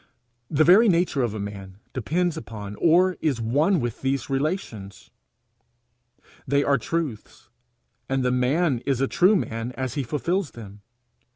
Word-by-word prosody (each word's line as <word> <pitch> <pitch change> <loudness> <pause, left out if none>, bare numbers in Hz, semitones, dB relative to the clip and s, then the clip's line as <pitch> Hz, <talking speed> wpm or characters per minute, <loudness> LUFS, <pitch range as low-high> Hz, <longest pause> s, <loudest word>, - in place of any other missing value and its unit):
The 155 +1 +3
very 200 +7 +6
nature 170 -5 +1
of 115 -3 -1
a - - -4
man 100 -2 -7 0.2
depends 165 +7 -1
upon 105 -7 -7
or 180 +2 +3
is 140 -6 0
one 145 - +2
with 120 -3 -4
these 135 0 -2
relations. 135 - -4 1.4
They 140 +2 +2
are 140 -1 +2
truths, 140 -6 -5 0.6
and 135 -1 0
the 125 - +2
man 130 +3 +1
is 135 -3 +1
a 135 - +1
true 185 +9 +4
man 115 - -3
as 130 -1 -4
he 145 - -1
fulfils 155 - -2
them. 105 -3 -11
135 Hz, 150 wpm, -24 LUFS, 115-165 Hz, 1.4 s, very